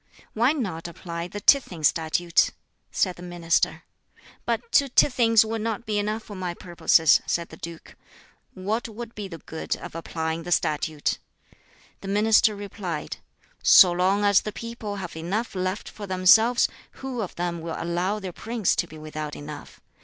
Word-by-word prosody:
"Why 240 +5 +3
not 190 - -3
apply 170 0 -6
the 205 +3 -7
Tithing 200 - +3
Statute?" 165 +3 +2 0.4
said 185 -2 0
the - - -11
minister. 175 -1 0 0.6
"But 235 0 -2
two 280 -1 +4
tithings 230 -4 +4
would 225 0 -3
not 225 +1 -3
be 210 -1 0
enough 215 +2 -2
for 210 - -10
my 180 -2 -4
purposes," 170 -3 +3
said 170 -1 -1
the 160 - -12
duke; 165 0 -9 0.6
"what 215 +5 -2
would 230 +1 -8
be 210 -2 -6
the 170 -3 -8
good 160 0 -4
of - - -9
applying 160 0 -3
the 175 +2 -7
Statute?" 150 -2 0 0.8
The 195 - -9
minister 210 +1 +4
replied, 200 -3 -5 0.4
"So 180 - +8
long 185 +4 +1
as 200 -1 +5
the 215 - -5
people 230 -2 -6
have 185 -4 -6
enough 190 +9 -3
left 185 +1 -3
for 205 -2 -8
themselves, 220 +6 +5 0.3
who 260 -3 -5
of 195 - -5
them 175 -1 -3
will 165 0 -5
allow 175 +4 -1
their 190 -4 -6
prince 225 -1 -1
to - - 0
be 155 - -12
without 155 -1 -6
enough? 145 0 -10
185 Hz, 165 wpm, -25 LUFS, 170-220 Hz, 0.8 s, So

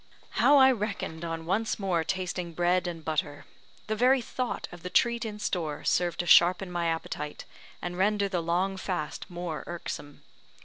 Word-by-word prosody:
How 290 - +7
I 265 -1 +8
reckoned 200 -8 -3
on 165 -1 -4
once 210 +6 0
more 185 -5 0
tasting 180 -1 -3
bread 175 +2 +2
and 165 -3 -6
butter! 150 -2 -2 0.4
The 215 - -1
very 255 +4 +4
thought 250 +1 -3
of 175 - -11
the 180 - -5
treat 235 +4 +2
in 210 -1 -5
store 165 -7 -2
served 175 -1 +1
to - - -6
sharpen 180 +2 +5
my 170 -1 -1
appetite, 150 -2 -4 0.4
and 175 0 -3
render 200 +2 +2
the 185 -3 -1
long 180 +4 0
fast 180 -5 -4
more 175 -4 -5
irksome. 145 -4 -6
180 Hz, 170 wpm, -28 LUFS, 165-200 Hz, 0.4 s, I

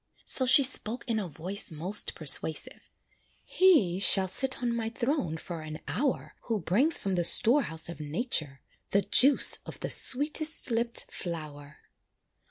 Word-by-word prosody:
So 260 - +5
she 275 +2 +5
spoke 245 -2 0
in 225 -2 -2
a 200 - -6
voice 180 +7 -6
most 175 +6 0
persuasive 155 +1 +2 0.5
"He 290 - +1
shall 195 -1 +3
sit 260 +4 +5
on 235 -1 -3
my 225 -1 -5
throne 235 - -4
for 165 0 -10
an 155 0 -10
hour, 270 0 -4
Who 225 -3 -4
brings 230 - +2
from 195 - -5
the 175 -1 -2
store 240 - +2
house 160 -9 -4
of 170 - -11
nature, 155 - -4 0.3
The 200 0 -1
juice 275 +9 +3
of - - -11
the - - -4
sweetest 305 +1 0
lipped 235 +1 0
flower." 150 -4 -10
200 Hz, 155 wpm, -26 LUFS, 165-255 Hz, 0.5 s, So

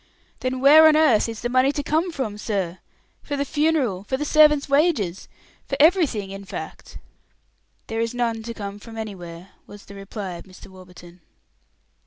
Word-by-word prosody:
"Then 255 0 -3
where 310 +3 +8
on 310 - +5
earth 275 -9 +3
is 225 -1 -7
the 240 - -1
money 255 +2 +3
to 290 - -3
come 320 +5 0
from, 260 -10 -4
sir? 190 -5 -3 0.4
For 285 - -5
the 280 - -1
funeral 290 -10 0
for 260 +6 -3
the 295 - -3
servants' 300 -1 +4
wages 280 - +1 0.4
for 275 - -3
everything, 290 - +3
in 195 0 -8
fact?" 195 - -9 0.9
"There 225 0 -3
is 230 +1 -3
none 230 -2 -1
to 230 +1 -7
come 200 -1 -7
from 225 +1 -12
anywhere," 180 -4 -8 0.2
was 205 0 -13
the 200 - -13
reply 195 0 -7
of 170 - -12
Mr. 190 0 -15
Warburton. 180 -1 -15
230 Hz, 175 wpm, -23 LUFS, 195-290 Hz, 0.9 s, where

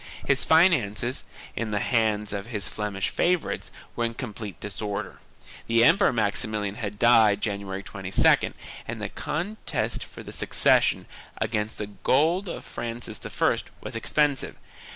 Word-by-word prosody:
His 140 -1 +3
finances, 130 - +3 0.3
in 115 0 -2
the 105 - -1
hands 105 -2 +1
of 100 +1 -4
his 105 -4 -1
Flemish 105 -2 -2
favorites, 175 -2 0 0.3
were 120 - -1
in 115 0 -1
com 120 -5 -5
plete 105 -2 -7
disorder. 105 0 -4 0.5
The 115 0 +4
Emperor 185 +10 +5
Maximilian 105 -2 0
had 105 -2 -5
died 110 -3 +5
January 100 -2 -3
22d 95 -2 +2 0.3
and - - -4
the - - -3
contest 180 +8 -2
for - - -11
the - - -9
succession, - - +3 0.3
against 110 0 -2
the 105 - -3
gold 160 - +1
of - - -6
Francis 115 -2 -5
I, - - +1 0.2
was - - -6
expensive. 145 -3 +1
110 Hz, 140 wpm, -26 LUFS, 105-130 Hz, 0.5 s, Emperor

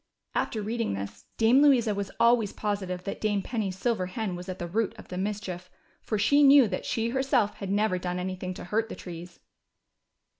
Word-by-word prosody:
After 215 -2 -1
reading 230 - -1
this. 100 +1 -7
Dame 230 +5 +5
Louisa 250 -7 +4
was 200 -1 -3
always 235 -3 +4
positive 190 -4 -3
that 195 - -5
Dame 205 -2 0
Penny's 200 -5 -3
silver 195 -3 0
hen 190 0 -3
was 180 +2 -8
at 185 - -4
the 175 - -4
root 210 +5 -1
of - - -13
the 180 - -5
mischief, 190 -3 -4 0.3
for 215 - -2
she 285 +8 +4
knew 280 -3 +8
that 185 - -4
she 230 0 0
herself 260 -4 +1
had 195 - -5
never 200 -2 +1
done 180 0 -3
anything 185 0 -4
to - - -8
hurt 220 +5 -1
the - - -6
trees. 175 0 -9
205 Hz, 195 wpm, -28 LUFS, 185-225 Hz, 0.3 s, knew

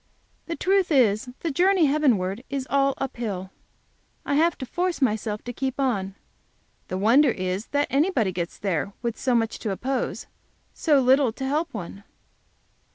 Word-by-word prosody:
The 335 - -3
truth 385 -1 +1
is, 245 -3 +3
the 330 - -1
journey 365 +3 +3
heavenward 245 -8 +1
is 275 -1 -3
all 275 -1 +2
up 270 -2 -4
hill 195 -5 -4 0.7
I - - -1
have 320 +3 +3
to 260 - -5
force 355 +6 -2
myself 215 -4 -1
to 245 - -6
keep 265 +2 -3
on. 200 -8 -1 0.7
The 185 - -3
wonder 245 +9 +5
is 185 -1 -2
that 285 0 +1
anybody 275 - +2
gets 170 -1 -4
there 195 0 -2
with 235 -1 -1
so 255 -2 0
much 225 -1 0
to 215 - -3
oppose 255 +7 -2 0.5
so 300 -4 +3
little 260 -1 +4
to 265 - -5
help 300 +4 -1
one! 200 -2 -7
255 Hz, 160 wpm, -25 LUFS, 210-285 Hz, 0.7 s, wonder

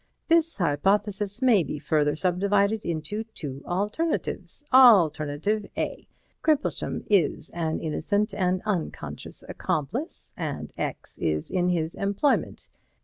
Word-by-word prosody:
This 330 0 +3
hypothesis 200 - 0
may 235 -7 +5
be 150 - -4
further 150 0 +1
subdivided 200 +5 +1
into 170 +6 -3
two 145 -11 -7
alternatives. 210 - -2
Alternative 200 - +5
A: - - -3 0.3
Crimplesham 305 -2 0
is 170 -5 +2
an 160 -2 -2
innocent 205 +7 -1
and 185 -2 0
unconscious 195 -6 -4
accomplice, 185 - -3
and 145 - -4
X - - -5
is 75 -2 -1
in 180 -1 +1
his 165 -2 0
employment. 200 +8 0
190 Hz, 110 wpm, -26 LUFS, 155-210 Hz, 0.3 s, may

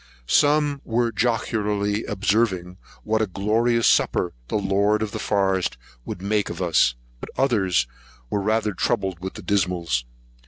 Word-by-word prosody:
Some 145 - +3
were 115 0 0
jocularly 105 -2 0
observing 95 -3 0 0.3
what 110 +1 +1
a 110 - +1
glorious 110 +5 +1
supper 90 - +2
the - - -3
lord 100 +2 +1
of 105 - -4
the - - -5
forest 95 -7 0 0.3
would 90 - -6
make 105 +1 0
of - - -6
us; 85 -9 +3 0.2
but - - -8
others 100 - +2 0.4
were 100 - -1
rather 110 +1 +1
troubled 95 -3 -1
with 95 +1 -6
the - - -9
dismaloes. 85 -10 0
100 Hz, 145 wpm, -23 LUFS, 95-110 Hz, 0.4 s, Some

